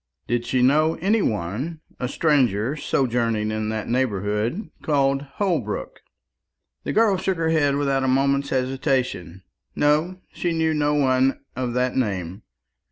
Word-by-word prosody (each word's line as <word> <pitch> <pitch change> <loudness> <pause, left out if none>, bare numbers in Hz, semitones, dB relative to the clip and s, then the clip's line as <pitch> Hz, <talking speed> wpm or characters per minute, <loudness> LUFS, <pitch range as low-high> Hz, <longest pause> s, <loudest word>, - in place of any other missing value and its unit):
Did 120 0 -1
she 130 -1 +1
know 155 +5 +3
any 205 +6 +1
one, 115 - -2 0.2
a 125 - -1
stranger, 130 - +1
sojourning 115 -6 0
in 110 0 -2
that 110 -1 -3
neighbourhood 115 - -1
called 140 -2 +1
Holbrook? 160 - -2 0.8
The - - -2
girl 215 -3 +3
shook 185 0 -1
her 165 -1 0
head 145 -3 +2
without 140 -2 +1
a - - +1
moment's 140 +1 +2
hesitation. 130 - -1 0.3
No, 155 +5 +1
she 175 -1 -1
knew 160 -1 +1
no 150 -1 +1
one 130 -1 +2
of 125 -2 -2
that 125 0 0
name. 95 -6 -2
135 Hz, 140 wpm, -23 LUFS, 115-155 Hz, 0.8 s, know